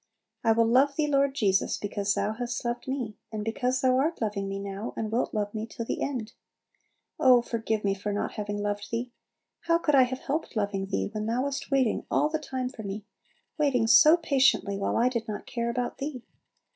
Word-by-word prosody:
I 225 -1 +5
will 230 +1 +3
love 265 +5 +4
Thee, 305 - +1
Lord 280 -1 +2
Jesus, 200 -6 +2
because 205 -1 -1
Thou 215 - 0
hast 245 +1 -4
loved 240 +3 -3
me, 250 -6 -4
and 210 -1 -4
because 250 +3 0
Thou 255 -1 +3
art 320 +5 0
loving 205 -3 -2
me 195 - -3
now, 200 +2 -5
and 220 -1 -2
wilt 235 +3 0
love 205 -2 -2
me 220 0 -4
to 230 - -6
the - - -3
end. 245 -4 -3 0.9
Oh, 255 -5 +6
forgive 225 -2 -2
me 200 -1 +2
for 205 +1 -4
not 205 - -2
having 205 -1 -4
loved 205 0 -3
Thee! 240 +2 -3 0.6
How 335 0 +5
could 315 -3 0
I 270 - +7
have 260 +1 -5
helped 300 -1 -3
loving 200 -2 -1
Thee, 195 +1 -2
when 215 0 -3
Thou 240 +3 0
wast 280 0 -3
waiting 265 -5 +1
all 300 - +2
the 315 0 -1
time 260 -4 -3
for 240 - -9
me, 200 0 -6 0.5
waiting 270 -6 +2
so 240 +9 +7
patiently 270 - +2
while 195 - -1
I 235 - +4
did 235 -3 -2
not 210 -1 -5
care 235 -1 -2
about 245 +1 -3
Thee! 275 -3 -5
235 Hz, 210 wpm, -28 LUFS, 210-265 Hz, 0.9 s, I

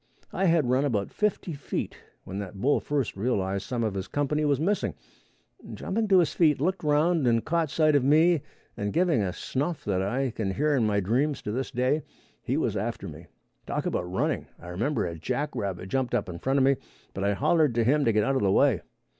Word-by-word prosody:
I 195 - 0
had 165 -6 +3
run 130 +2 +3
about 105 -9 -1
fifty 210 -4 -1
feet 140 -1 -4 0.3
when 95 +2 -6
that 100 -1 -7
bull 140 +8 +3
first 140 -5 -2
realized 100 -3 -1
some 120 -2 -1
of 110 -3 -1
his 95 -1 -4
company 145 +1 0
was 140 -2 +2
missing, 195 +6 0 0.7
and - - -9
jumping 220 +2 -1
to 195 -2 +5
his 170 -5 +3
feet 155 -5 +3
looked 185 +6 -1
around 150 0 +2
and 115 -1 +2
caught 165 -2 0
sight 155 0 +3
of 140 - +3
me, 155 +3 +4 0.3
and 100 0 -3
giving 170 -9 +2
a 95 -2 -1
snuff 145 - -3
that 95 -2 0
I 125 +7 -1
can 100 -4 -3
hear 150 +1 +2
in 115 -5 +2
my 100 -1 +1
dreams 130 +10 0
to 105 - -3
this 130 +4 -2
day, 130 +5 +1 0.4
he - - -1
was - - 0
after - - -3
me. - - -10 0.4
Talk - - -2
about 90 0 -2
running. 95 - -1
I 85 - -10
remember 115 +12 -1
a 85 -2 -5
jackrabbit 100 - -3
jumped 130 0 0
up - - -1
in 85 -2 -7
front 135 +1 0
of 135 - +4
me, 135 0 +3 0.4
but 95 - -4
I 100 0 +2
hollered 150 - +2
to 120 - +3
him 145 +5 +3
to 115 - +4
get 105 -1 +2
out 135 +5 +1
of - - +1
the 100 -2 +2
way. - - +3
130 Hz, 220 wpm, -27 LUFS, 100-150 Hz, 0.7 s, to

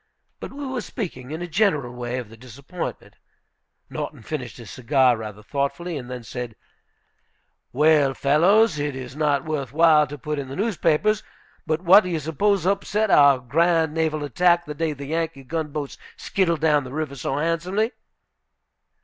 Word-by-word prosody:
But - - -7
we 285 +1 -7
were 260 -2 -3
speaking, 150 - -6
in 160 +3 -5
a - - -4
general 160 - +1
way, 120 0 -4
of 120 -4 -6
the 115 - -13
disappointment. 135 - -8 0.7
Norton - - -6
finished 130 -4 -5
his 115 -3 -10
cigar 130 0 +3
rather 105 -2 -8
thoughtfully, 145 +8 -3
and 125 -4 -6
then 125 -1 -6
said: 120 0 -6 1.2
"Well, 145 -1 +3
fellows, 170 +6 +3
it 145 -1 -2
is 130 -1 -8
not 150 -2 +1
worth 145 -6 -3
while 155 -1 +5
to 145 - -8
put 150 +2 -4
in 135 - -5
the 135 - -7
newspapers, 205 -1 +1 0.5
but 155 +1 0
what 190 +4 +7
do 180 - -4
you 165 -2 -1
suppose 175 +5 0
upset 200 +2 0
our 140 -2 +6
grand 160 +5 +1
naval 155 -2 -1
attack, 175 +5 +2
the 150 - -5
day 160 +1 -1
the 140 0 -8
Yankee 160 -2 -3
gunboats 150 -1 -4 0.2
skittled 170 -5 0
down 150 -3 +3
the 130 - -9
river 150 -1 -3
so 135 +1 -3
handsomely?" 175 +8 0
150 Hz, 165 wpm, -23 LUFS, 135-170 Hz, 1.2 s, what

